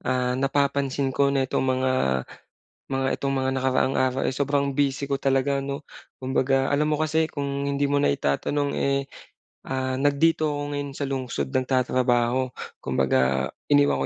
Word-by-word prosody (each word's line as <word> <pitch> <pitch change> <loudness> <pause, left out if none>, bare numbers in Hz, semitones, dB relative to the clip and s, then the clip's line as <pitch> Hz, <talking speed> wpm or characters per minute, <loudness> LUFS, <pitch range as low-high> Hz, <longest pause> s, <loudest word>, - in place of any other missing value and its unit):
ah, 125 -1 0
napapansin 140 0 0
ko 140 +1 +3
na 135 -1 +1
itong - - -1 0.2
mga, 130 0 +1 1.0
mga 135 0 0
itong 140 - -2
mga 130 -1 0
nakaraang 130 0 +1
araw 130 0 +1
ay 130 - -1
sobrang 140 0 0
busy 140 0 0
ko 140 - 0
talaga 135 0 +1
'no. 140 +1 -5 0.3
Kumbaga, 135 +1 +1
alam 145 +1 +2
mo 150 - 0
kasi 155 0 +1
kung 140 -1 -3 0.2
hindi 140 0 0
mo 140 - +1
naitatanong, 140 - 0
eh, 140 0 +1 0.7
ah, 130 0 -2
nag 140 +1 +1
dito 160 -2 +3
ako 145 - -3 0.2
ngayon 140 -1 -4
sa 140 0 -3
lungsod 125 - -3
nagtatrabaho. 125 - +1 0.2
Kumbaga, 65 0 +1 0.2
iniwan 70 -1 +3
135 Hz, 155 wpm, -25 LUFS, 130-140 Hz, 1.0 s, ko